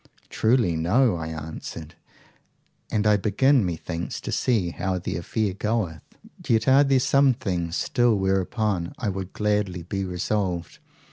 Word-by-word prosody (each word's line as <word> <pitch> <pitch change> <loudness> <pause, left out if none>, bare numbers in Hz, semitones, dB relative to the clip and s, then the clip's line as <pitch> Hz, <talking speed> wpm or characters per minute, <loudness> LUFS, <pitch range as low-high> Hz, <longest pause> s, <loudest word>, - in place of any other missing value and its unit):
Truly 110 -7 +2
no, 100 +7 +2
I 80 -1 -4
answered; 80 0 -7 1.0
and 105 -1 0
I 105 -1 +5
begin, 120 +6 +3
methinks, 85 -1 -4
to - - -5
see 105 -9 +1
how 95 +2 -2
the 90 - -4
affair 100 +4 -1
goeth. 100 -6 -2 0.5
Yet 110 -1 +2
are 135 +2 +6
there 135 -2 +3
some 135 0 +3
things 90 -7 -3
still 120 -1 +2
whereupon 95 -1 -1
I 115 - -2
would 95 -1 -5
gladly 105 -4 -1
be 95 +3 -3
resolved. 90 -1 -2
100 Hz, 140 wpm, -24 LUFS, 85-110 Hz, 1.0 s, are